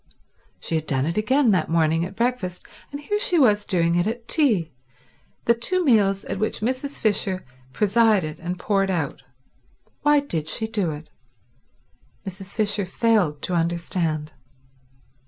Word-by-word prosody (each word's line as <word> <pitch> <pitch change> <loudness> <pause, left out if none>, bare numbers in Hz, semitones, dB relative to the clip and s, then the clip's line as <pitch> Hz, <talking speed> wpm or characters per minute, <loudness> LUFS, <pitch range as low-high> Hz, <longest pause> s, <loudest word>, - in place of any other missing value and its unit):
_" - - -29 0.5
She - - -4
had 160 -1 -1
done 135 -1 0
it 165 +2 -2
again 250 +3 +3
that 180 -5 +1
morning 165 0 +2
at 190 +3 -6
breakfast 230 -7 -2 0.3
and 285 - -6
here 415 +8 -1
she 360 -4 +2
was 210 -8 +4
doing 170 -2 +1
it 175 +3 +1
at 230 +1 -4
tea—the 160 - -1
two 360 +10 -1
meals 200 -6 +3
at - - -4
which 215 0 -1
Mrs. 260 +5 -2
Fisher 195 -3 0 0.3
presided 205 - +2
and 175 +2 -4
poured 195 0 0
out. 160 -7 -2 0.8
Why 295 0 +4
did 165 - -2
she 190 +8 -1
do 210 -6 -1
it? 150 +1 -8 1.1
Mrs. 195 0 -8
Fisher 210 -2 +1
failed 190 -8 +1
to 180 - -1
understand. 165 -2 -1
195 Hz, 150 wpm, -23 LUFS, 165-230 Hz, 1.1 s, was